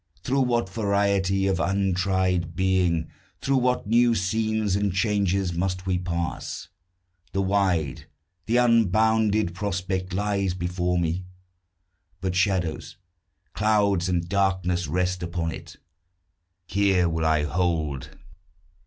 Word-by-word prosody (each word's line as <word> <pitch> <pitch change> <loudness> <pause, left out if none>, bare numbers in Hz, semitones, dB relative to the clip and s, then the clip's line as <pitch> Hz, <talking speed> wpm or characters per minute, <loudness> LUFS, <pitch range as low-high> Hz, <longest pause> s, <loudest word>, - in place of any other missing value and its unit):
Through 135 +1 +1
what 120 -5 +1
variety 100 -2 +1
of 95 -2 +1
untried 95 -3 0
being, 90 -3 +1 0.3
Through 135 0 +1
what 125 0 +1
new 120 +2 +3
scenes 110 +1 0
and 100 0 0
changes, 100 -2 0
must 90 +2 -2
we 90 -1 0
pass! 85 -2 -4 0.6
The 95 - +1
wide, 95 -8 0 0.4
the 115 +2 +2
unbounded 110 -4 +3
prospect 95 -1 -3
lies 100 -1 -1
before 90 0 -1
me; 85 +2 -1 0.9
But 95 -1 -2
shadows, 90 -4 -1 0.6
clouds, 100 -4 +2
and 85 -1 0
darkness 95 -3 0
rest 90 +3 -1
upon 85 -1 -2
it. - - -9 0.9
Here 95 -1 +2
will 80 -1 -1
I 80 -2 +2
hold. 80 -3 -1
95 Hz, 110 wpm, -25 LUFS, 90-100 Hz, 0.9 s, new